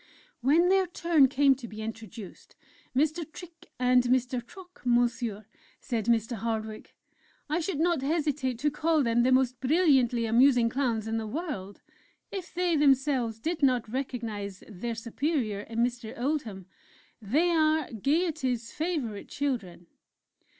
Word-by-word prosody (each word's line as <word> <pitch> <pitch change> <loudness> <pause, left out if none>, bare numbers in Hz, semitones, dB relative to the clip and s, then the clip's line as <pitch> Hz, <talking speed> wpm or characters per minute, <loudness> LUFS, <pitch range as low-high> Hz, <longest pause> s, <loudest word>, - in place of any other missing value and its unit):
When 320 +8 +4
their 380 -1 +3
turn 335 -5 +3
came 275 +1 +4
to 260 -2 -8
be 215 0 -7
introduced; 220 -3 -9 0.4
"Mr. 310 +5 +1
Trick 335 -2 -12
and 250 0 +4
Mr. 250 0 +1
Trock, 360 +9 -15
Monsieur" 235 -3 0 0.3
said 230 -3 -3
Mr. 230 0 +1
Hardwick: 220 0 -4 0.5
"I 310 +3 0
should 340 -2 -3
not 335 -3 +2
hesitate 285 -4 -1
to 295 +5 0
call 310 0 +1
them 235 0 +2
the 255 +2 +3
most 255 -1 +2
brilliantly 265 -5 +3
amusing 240 +1 +4
Clowns 230 -4 -1
in 225 0 -1
the 220 -1 -3
world, 235 - -5 0.5
if 375 -3 -6
they 355 -1 +1
themselves 270 -5 +2
did 320 +5 -3
not 250 -5 +2
recognize 225 -7 -4
their 225 +3 -5
superior 230 -1 -2
in 225 +3 -2
Mr. 240 -2 -3
Oldham... 245 - -2 0.6
they 295 - +2
are 315 -2 +2
Gaiety's 265 - -1
favorite 300 - -3
children!"... 225 -12 -3
255 Hz, 135 wpm, -28 LUFS, 225-305 Hz, 0.6 s, When